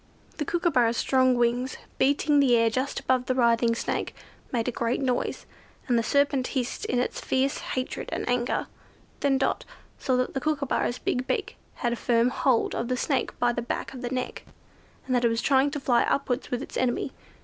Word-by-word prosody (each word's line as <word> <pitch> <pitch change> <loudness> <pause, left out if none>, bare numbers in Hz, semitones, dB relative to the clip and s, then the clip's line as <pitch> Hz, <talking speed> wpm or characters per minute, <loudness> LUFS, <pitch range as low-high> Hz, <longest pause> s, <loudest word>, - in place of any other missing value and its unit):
The 300 - -2
Kookooburra's 265 -9 +2
strong 255 -1 +3
wings, 240 +2 0 0.2
beating 290 +1 +3
the 255 -4 +5
air 230 -1 +3
just 260 +5 -1
above 260 -2 +1
the 255 - +1
writhing 235 -1 +3
Snake, - - -3 0.4
made 235 -2 -1
a - - +1
great 235 +1 -1
noise, 255 -3 -1 0.4
and 245 - +2
the 230 - +3
serpent 280 +1 +2
hissed 250 -1 -2
in 250 - 0
its 250 - -1
fierce 265 +1 0
hatred 255 0 -4
and - - -3
anger. 245 0 0 0.5
Then 275 -1 +2
Dot 270 0 0 0.4
saw 255 -2 +1
that 255 - 0
the 270 - -2
Kookooburra's 280 -4 0
big 255 +1 -2
beak - - -2 0.2
had 240 -2 -1
a - - -4
firm 235 0 +2
hold 255 -2 +1
of 235 - -2
the 255 0 -1
Snake 265 -1 -1
by 240 0 +2
the 240 - -2
back 240 - -4
of 255 - -8
the 245 - -3
neck, 255 0 -3 0.6
and 255 - -2
that 245 -1 +2
it 235 - +4
was 230 0 0
trying 270 +2 +3
to 290 +1 -4
fly 245 -3 +3
upwards 265 -1 0
with 250 +2 -2
its - - -7
enemy. 255 +1 0
255 Hz, 200 wpm, -26 LUFS, 240-270 Hz, 0.6 s, the